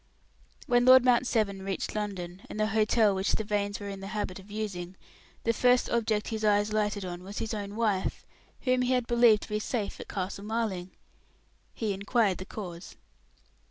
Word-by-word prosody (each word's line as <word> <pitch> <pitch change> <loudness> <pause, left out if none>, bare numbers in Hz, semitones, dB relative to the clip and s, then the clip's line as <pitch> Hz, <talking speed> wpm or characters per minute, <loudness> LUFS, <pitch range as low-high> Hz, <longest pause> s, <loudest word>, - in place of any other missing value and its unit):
When 245 0 +3
Lord 255 0 +8
Mount 250 0 +4
Severn 200 -5 0
reached 195 -1 -3
London, 190 -4 -4
and 215 - -6
the 215 0 +2
hotel 215 -1 +4
which 190 +1 0
the 220 - 0
Vanes 205 -1 -1
were 205 - -6
in 195 -1 -6
the 195 - -7
habit 185 -2 -3
of 190 +2 -15
using, 195 -4 -5 0.5
the 230 - +2
first 250 +2 +3
object 220 -3 0
his 220 -1 -3
eyes 210 0 +3
lighted 210 -2 0
on 175 -1 -6
was 195 +3 -9
his 225 - -3
own 205 -1 -5
wife, 215 -4 -1 0.4
whom 255 -1 +2
he 250 +1 +2
had 250 -2 +1
believed 235 -3 +5
to - - -10
be 210 0 -1
safe 215 -1 -3
at - - -8
Castle 195 +1 -4
Marling. 210 -5 -2 0.8
He 215 -3 -2
inquired 200 0 +1
the 185 - -6
cause. 180 -4 -8
210 Hz, 190 wpm, -29 LUFS, 195-225 Hz, 0.8 s, Lord